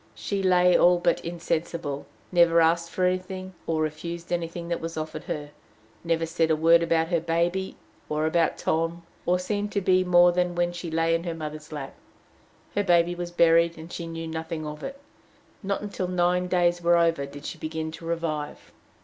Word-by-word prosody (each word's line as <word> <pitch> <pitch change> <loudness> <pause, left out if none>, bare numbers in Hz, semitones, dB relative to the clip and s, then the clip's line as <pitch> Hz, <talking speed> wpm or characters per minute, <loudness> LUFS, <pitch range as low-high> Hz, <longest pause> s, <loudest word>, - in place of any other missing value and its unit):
She 200 -1 -3
lay 180 -1 +4
all 180 0 +5
but 175 - +1
insensible, 165 -3 -3 0.2
never 170 -2 +5
asked 165 +1 +3
for 185 - 0
anything, 185 +1 -2
or 160 -1 +1
refused 170 +3 -5
anything 170 0 -3
that 170 - -2
was 165 0 -5
offered 155 0 -5
her, 145 -1 -5 0.5
never 165 -1 0
said 165 0 0
a 160 - +4
word 165 +2 +5
about 165 -1 +1
her 170 -2 +2
baby, 170 +4 -1 0.3
or 155 +1 0
about 165 +1 +1
Tom, 165 +1 -1 0.2
or 180 +1 +4
seemed 205 +3 -2
to 200 - +2
be 185 -1 +3
more 175 -1 +6
than 180 0 0
when 175 0 +1
she 175 -1 -6
lay 165 +1 +1
in 165 0 0
her 170 -1 -3
mother's 155 -1 -7
lap. 145 -3 -6 0.8
Her 205 - +1
baby 175 -2 +3
was 175 0 -5
buried, 170 -1 +4
and 160 +2 -10
she 170 - -5
knew 165 0 -5
nothing 160 0 -4
of 150 0 -7
it. 275 0 -6 0.6
Not 200 -2 -2
until 200 -3 -3
nine 180 0 +1
days 175 -1 +2
were 170 0 +4
over 165 -4 +2
did 145 +1 -11
she - - -6
begin 160 0 -4
to 165 +1 -10
revive. 165 -3 -3
170 Hz, 190 wpm, -26 LUFS, 160-175 Hz, 0.8 s, more